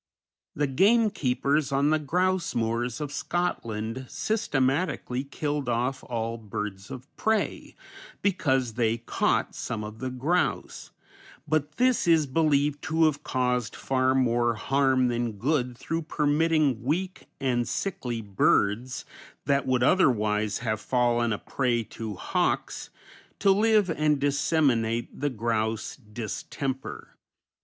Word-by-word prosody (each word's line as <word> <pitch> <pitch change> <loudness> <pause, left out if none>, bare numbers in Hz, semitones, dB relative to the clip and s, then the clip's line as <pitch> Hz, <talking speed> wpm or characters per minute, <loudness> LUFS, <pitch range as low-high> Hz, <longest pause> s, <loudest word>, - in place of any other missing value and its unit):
The 145 - +1
gamekeepers 150 - +2
on 140 +2 +2
the 155 - +3
grouse 180 +4 0
moors 115 +1 -1
of 150 -2 -4
Scotland 130 -7 -3
systematically 135 - 0
killed 145 -1 -3
off 125 +3 -1
all 115 -1 -3
birds 105 -2 -5
of 130 0 -8
prey 220 0 -1 0.5
because 135 - +1
they 115 -1 +1
caught 115 - 0
some 105 -1 -4
of 105 +1 -8
the 130 - -3
grouse, 145 +8 -1 0.6
but 150 -1 0
this 250 -2 +2
is 165 -2 +5
believed 145 0 +1
to 160 0 +3
have 150 -2 +1
caused 125 -3 -1
far 130 0 +1
more 120 -2 +2
harm 135 +1 +2
than 120 -1 -1
good 125 +2 -1
through 165 +5 -3
permitting 150 -3 +1
weak 180 - -2
and 120 -3 0
sickly 130 - -3
birds, 105 +4 +1 0.4
that 140 -1 +1
would 125 -1 +2
otherwise 110 - +2
have 110 -1 -1
fallen 120 -2 +1
a 105 - 0
prey 120 -1 -1
to 110 -1 -7
hawks, - - -1 0.5
to 195 - +4
live 210 0 +4
and 150 -2 +1
disseminate 140 -5 +1
the 145 - +1
grouse 110 -2 -2
distemper. 120 +3 -6
130 Hz, 120 wpm, -27 LUFS, 115-150 Hz, 0.6 s, is